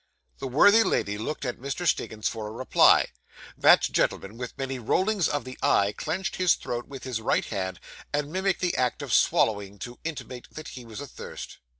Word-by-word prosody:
The 135 - -4
worthy 200 - +6
lady 105 - 0
looked 145 +6 -4
at 125 - -3
Mr. 140 +7 -4
Stiggins 110 -9 0
for 110 -2 -4
a - - -7
reply; 120 +4 +4 0.5
that - - +6
gentleman, 100 +3 0
with 125 0 -7
many 135 -1 -3
rollings 190 - +1
of 145 -3 -1
the 130 0 -9
eye, 100 +1 +3
clenched 190 +6 -3
his 185 -2 +4
throat 120 0 -5
with 135 -2 -9
his 125 -4 -3
right - - +1
hand, 95 -3 -4 0.3
and 145 0 -1
mimicked 190 +1 0
the 180 -1 +1
act 125 -1 0
of - - -3
swallowing, 100 -2 +2
to 120 +5 -8
intimate 135 -6 -6
that 155 - -8
he 125 -2 -9
was 115 +3 -8
athirst. 140 - -9
130 Hz, 190 wpm, -27 LUFS, 110-155 Hz, 0.5 s, worthy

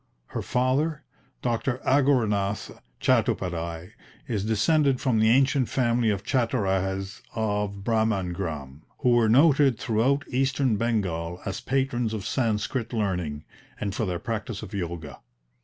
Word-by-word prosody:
Her - - -3
father, 140 +5 0 0.4
Dr. 120 +2 0
Aghorenath 110 -8 +1 0.2
Chattopadhyay, 85 0 0 0.4
is 105 -5 -1
descended 130 +6 +2
from 125 -5 +1
the 110 0 +4
ancient 130 +1 +3
family 120 -3 +2
of 100 -1 -1
Chattorajes 95 -6 -1
of 105 -2 -1
Bhramangram, 90 - -1 0.2
who 125 - +3
were 120 -2 +4
noted 140 0 +5
throughout 120 +7 +1
Eastern 130 -2 +1
Bengal 90 -7 -1
as 95 - -4
patrons 125 -4 0
of 100 -3 -5
Sanskrit 115 0 -1
learning, 90 -9 -2 0.4
and 100 -2 -2
for 110 +1 -1
their 90 -1 -1
practice 110 +2 -4
of 105 - -9
Yoga. 85 -6 -5
110 Hz, 125 wpm, -26 LUFS, 95-125 Hz, 0.4 s, noted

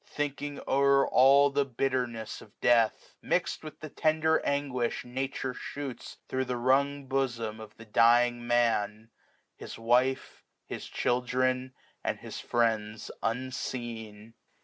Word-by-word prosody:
Thinking 145 0 -4
o*er 140 0 +4
all 140 +2 +6
the 140 0 +2
bitterness 125 -4 -2
of 105 - -17
death; 115 -2 +2
MixM - - 0
with 155 - -9
the 155 - -6
tender 160 +1 +2
anguish 135 -5 -1
Nature 130 +1 -3
shoots 140 -1 -7
Thro* 130 0 -1
the 125 -1 -3
wrung 140 +3 +2
bosom 120 -5 -2
of 110 -1 -11
the 115 - -12
dying 120 +2 +4
Man, 115 -2 +1 0.5
His - - -8
wife, 125 +3 +1 0.2
his - - -6
children, 125 +1 0 0.3
and - - -1
his - - -7
friends 110 -2 -1
unseen. 115 -3 -4
125 Hz, 125 wpm, -29 LUFS, 115-135 Hz, 0.5 s, all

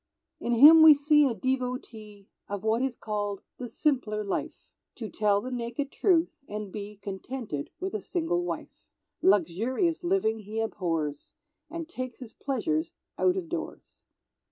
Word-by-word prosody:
In 240 - -1
him 300 +7 +9
we 315 -1 +10
see 295 0 +4
a 240 - -2
devotee 240 -4 -4 0.2
Of 205 0 -4
what 220 +2 +1
is 265 -2 -1
called 205 -2 -3 0.2
the 245 -1 -5
"simpler 235 -9 0
life" 200 - -4 0.3
(To 225 -3 -6
tell 205 -1 +2
the 255 - -6
naked 245 +3 -3
Truth, 350 -3 +2
and 210 -1 -5
be 210 +1 -7
Contented 200 - -5
with 380 +1 -4
a 430 - -2
single 350 0 -1
wife). - - -6 0.4
Luxurious 225 - +2
living 345 - +1
he 215 +1 -5
abhors, 165 -9 -3 0.3
And 330 0 -6
takes 255 -7 -6
his 245 -4 -10
pleasures 315 +5 -2 0.3
out 370 0 +3
of 365 -3 -3
doors. 335 0 -7
245 Hz, 150 wpm, -28 LUFS, 210-310 Hz, 0.4 s, we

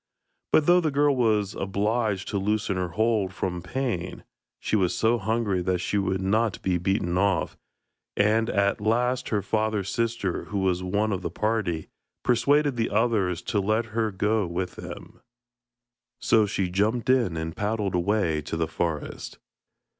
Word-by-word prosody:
But 155 - +4
though 175 +2 +5
the 160 - +1
girl 145 0 +2
was 110 -5 +1
obliged 100 +1 -1
to 100 - -1
loosen 105 0 0
her 90 -1 -1
hold 110 +1 0
from 90 -2 -3
pain, 95 -3 -3 0.4
she - - -1
was 95 -4 +1
so 115 +1 +2
hungry 110 -3 0
that 90 +1 0
she 100 +3 -1
would 95 -1 -1
not 110 +1 +1
be 90 -2 +1
beaten 90 -1 0
off, 100 -3 +1 0.6
and 110 +3 +3
at 100 0 +1
last 125 +4 +1
her 105 -3 0
father's 110 -2 -1
sister, 115 -6 -1
who 105 - -4
was 95 -2 +1
one 105 +4 0
of 95 - -2
the - - -3
party, 95 -4 -1 0.4
persuaded 140 +3 +2
the 115 - 0
others 105 -5 +1
to 105 - 0
let 110 +4 +1
her 115 -1 +1
go 105 0 0
with 90 +2 -3
them. - - -10 1.0
So 110 -2 +3
she 95 -2 -1
jumped 110 +5 0
in 120 -10 +2
and 80 0 -4
paddled 105 -2 -1
away 90 -3 +1
to 80 - -4
the 80 -1 0
forest. 80 -2 -4
105 Hz, 160 wpm, -26 LUFS, 95-115 Hz, 1.0 s, though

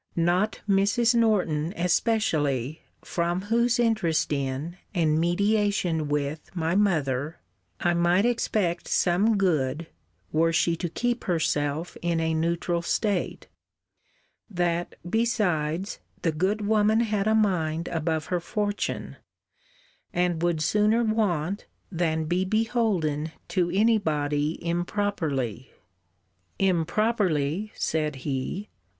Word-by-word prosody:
Not 175 +5 +1
Mrs. 205 +4 +3
Norton 185 -8 +1
especially, 160 - +1 0.2
from 175 +1 -1
whose 235 +1 +3
interest 215 -11 +1
in, 140 +5 -3 0.2
and 155 -3 +2
mediation 180 -2 +1
with, 145 +1 -2
my 165 -1 0
mother, 155 -7 +1 0.4
I 175 - +2
might 175 +4 +3
expect 210 -7 0
some 200 +5 +2
good, 160 -5 +1 0.5
were 165 +2 +3
she 165 +1 +2
to 175 0 -3
keep 240 +7 -2
herself 160 -2 -1
in 170 -1 0
a 160 0 0
neutral 170 +1 0
state: 200 +2 -1 1.0
that, 175 -3 -1
besides, 190 -6 0 0.2
the 165 - +2
good 195 +7 0
woman 215 +1 +3
had 210 -3 0
a 220 - +3
mind 170 -6 +1
above 160 -1 -1
her 180 - +2
fortune; 205 +3 -3 0.9
and 175 -2 0
would 170 -3 +1
sooner 210 +7 +3
want 200 -5 0 0.2
than 160 -3 0
be 175 +4 +1
beholden 190 -8 0 0.2
to 180 -3 +1
any 215 +5 +3
body 150 -2 -1
improperly. 170 - -2 0.9
Improperly! 190 -1 +1
said 155 -2 -1
he. 145 +9 -3
175 Hz, 110 wpm, -26 LUFS, 160-205 Hz, 1.0 s, Mrs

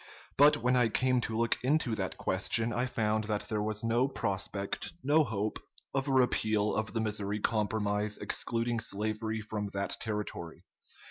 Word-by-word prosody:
But 145 +2 +6
when 125 +2 +2
I 120 -2 +4
came 130 +2 +2
to 110 -1 -2
look 115 0 +1
into 135 -2 +1
that 95 -3 -3
question, 110 +5 +2
I 125 +4 0
found 110 -2 0
that 105 -1 -2
there 105 -1 0
was 110 +1 -2
no 120 +3 +2
prospect, 100 -5 -3
no 150 +3 +4
hope, 110 -5 -2 0.3
of 135 0 -1
a - - 0
repeal 110 -5 +2
of 110 0 -2
the 115 - 0
Missouri 105 -1 -1
Compromise 105 -1 0
excluding 115 0 -1
slavery 110 +1 -2
from 105 -1 -4
that 100 0 -2
territory.... 105 -6 -4
110 Hz, 160 wpm, -31 LUFS, 105-120 Hz, 0.3 s, But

